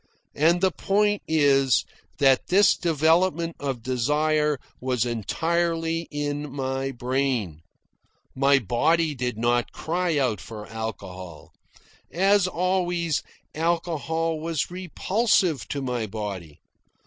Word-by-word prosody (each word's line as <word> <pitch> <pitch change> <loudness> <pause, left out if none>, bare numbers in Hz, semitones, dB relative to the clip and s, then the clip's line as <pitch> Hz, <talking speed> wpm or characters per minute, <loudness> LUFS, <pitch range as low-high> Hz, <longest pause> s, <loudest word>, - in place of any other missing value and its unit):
And 170 +4 +3
the 190 -1 +3
point 205 +3 +1
is 140 -4 +3 0.3
that 135 -2 +3
this 195 +2 +5
development 165 +1 +1
of 135 -5 -4
desire 150 +4 +1 0.2
was 125 -2 0
entirely 165 - -1
in 145 -1 -3
my 135 0 -2
brain. 125 - -1 0.7
My 140 +1 +4
body 150 - +1
did 125 -4 -3
not 120 +1 0
cry 170 -1 -1
out 120 -9 0
for 105 +4 -8
alcohol. 95 -7 -7 0.6
As 195 +2 +3
always, 175 -3 0 0.3
alcohol 165 -1 -1
was 165 0 -2
repulsive 185 - 0
to 140 -1 -4
my 125 -4 -2
body. 95 -7 -6
145 Hz, 105 wpm, -25 LUFS, 125-170 Hz, 0.7 s, this